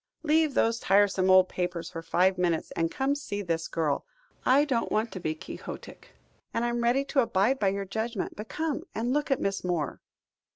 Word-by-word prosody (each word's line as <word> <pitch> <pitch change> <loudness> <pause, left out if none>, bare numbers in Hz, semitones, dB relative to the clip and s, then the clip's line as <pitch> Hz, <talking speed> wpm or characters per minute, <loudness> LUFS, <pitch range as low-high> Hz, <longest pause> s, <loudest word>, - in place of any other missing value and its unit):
"Leave 310 -2 +2
those 230 +1 +2
tiresome 195 -2 +3
old 185 0 +7
papers 180 -2 -3
for 165 - -5
five 180 +3 +2
minutes, 175 -3 0
and 165 0 0
come 265 +7 -1
and 285 - +1
see 205 -7 -4
this 165 -2 -1
girl. 155 -3 -1 0.4
I 275 +3 +5
don't 250 -6 -1
want 220 +2 0
to 185 - -6
be 155 -2 -2
quixotic, - - -9 0.4
and 235 - +1
I - - +1
am 240 0 -1
ready 255 +4 +2
to 275 - 0
abide 230 +3 +2
by 200 - +2
your 195 +1 -1
judgment, 220 +2 -3
but 210 0 -8
come 310 +5 -2
and 240 +3 0
look 295 +1 0
at 270 - +2
Miss 195 0 -1
Moore." 175 -5 -2
205 Hz, 205 wpm, -28 LUFS, 180-255 Hz, 0.4 s, old